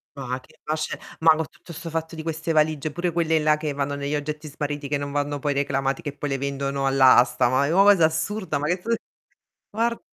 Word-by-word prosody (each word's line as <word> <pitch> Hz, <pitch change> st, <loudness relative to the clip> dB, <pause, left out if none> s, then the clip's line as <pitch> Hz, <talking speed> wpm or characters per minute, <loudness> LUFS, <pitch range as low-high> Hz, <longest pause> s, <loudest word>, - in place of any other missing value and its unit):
Ma 130 Hz, -2 st, -4 dB
che 130 Hz, -, -23 dB
ma 155 Hz, -, -1 dB
c'è 155 Hz, 0 st, -3 dB, 0.2 s
ma 160 Hz, -1 st, +6 dB
co' 160 Hz, 0 st, -2 dB
tutto 170 Hz, -, -14 dB
'sto 165 Hz, +2 st, -7 dB
fatto 160 Hz, +1 st, -3 dB
di 160 Hz, -, -6 dB
queste 160 Hz, 0 st, -3 dB
valigie, 155 Hz, -1 st, +1 dB
pure 175 Hz, +3 st, -2 dB
quelle 160 Hz, -1 st, +2 dB
là 150 Hz, 0 st, +3 dB
che 150 Hz, -1 st, -3 dB
vanno 140 Hz, 0 st, -2 dB
negli 140 Hz, +1 st, -2 dB
oggetti 150 Hz, +1 st, -4 dB
smarriti 145 Hz, 0 st, -4 dB
che 145 Hz, +1 st, 0 dB
non 140 Hz, 0 st, -4 dB
vanno 145 Hz, 0 st, -1 dB
poi 145 Hz, +1 st, -1 dB
reclamati, 135 Hz, -1 st, -1 dB
che 145 Hz, -1 st, -6 dB
poi 145 Hz, -, -3 dB
le 135 Hz, -, 0 dB
vendono 140 Hz, 0 st, -2 dB
all'asta, 130 Hz, -2 st, +5 dB
ma 130 Hz, +2 st, +2 dB
è 155 Hz, -, 0 dB
o 195 Hz, +3 st, +6 dB
cosa 200 Hz, -5 st, +6 dB
assurda, 160 Hz, +1 st, -1 dB
ma 145 Hz, -, -3 dB
che 175 Hz, +3 st, +1 dB
f 230 Hz, +4 st, 0 dB, 0.8 s
guar 230 Hz, +2 st, 0 dB
150 Hz, 230 wpm, -24 LUFS, 140-160 Hz, 0.8 s, ma